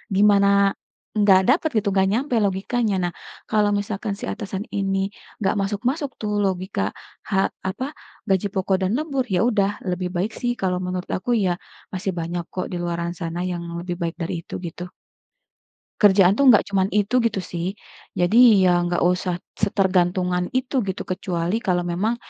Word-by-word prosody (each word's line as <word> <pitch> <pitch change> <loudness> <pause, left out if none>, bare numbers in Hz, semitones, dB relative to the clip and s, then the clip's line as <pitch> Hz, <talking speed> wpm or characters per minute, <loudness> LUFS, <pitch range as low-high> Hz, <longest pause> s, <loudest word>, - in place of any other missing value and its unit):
gimana, 200 0 +5 0.7
nggak 195 -2 +6
dapet 315 +4 +3
gitu, 205 - -1
nggak 190 0 +4
nyampe 250 +4 0
logikanya. 200 +3 0
Nah, 175 - -6 0.4
kalau 210 -1 +3
misalkan 205 +1 -2
si - - -5
atasan 200 -2 -5
ini 195 -1 0 0.3
nggak 205 -1 +1
masuk-masuk 250 +9 -1
tuh 210 -1 -2
logika 185 - -1 0.4
ha 195 0 +3 0.2
apa, 255 +7 -4 0.4
gaji 195 +1 +2
pokok 190 0 +1
dan 185 - +1
lembur, 280 -4 -1
ya 180 - +2
udah 205 -2 0
lebih 180 0 -2
baik 190 +5 0
sih 245 -1 +1
kalau 185 -1 +1
menurut 180 0 -3
aku 215 +6 -3
ya, 180 - +2 0.4
masih 185 +1 -2
banyak 170 +1 -3
kok 185 - -3
di - - -3
luaran 170 0 -2
sana 170 -1 -4
yang 175 -1 -4 0.2
lebih 175 0 -4
baik 170 0 -2
dari 165 - -2
itu, - - -8
gitu. 180 +2 -8 1.1
Kerjaan 195 -3 +6
tuh 280 - +5
nggak 220 - +7
cuman 190 -1 +2
itu, 205 +3 -2
gitu 220 -4 0
sih, 170 -1 -3 0.5
jadi 175 +6 +3 0.3
ya 185 - +5 0.2
nggak 175 0 0
usah 180 0 -1 0.3
setergantungan 180 -2 +2
itu, 260 +2 -3
gitu, 190 - -3
kecuali 180 0 -1
kalau 180 -1 +2
memang, 210 +7 0
190 Hz, 165 wpm, -23 LUFS, 180-205 Hz, 1.1 s, nggak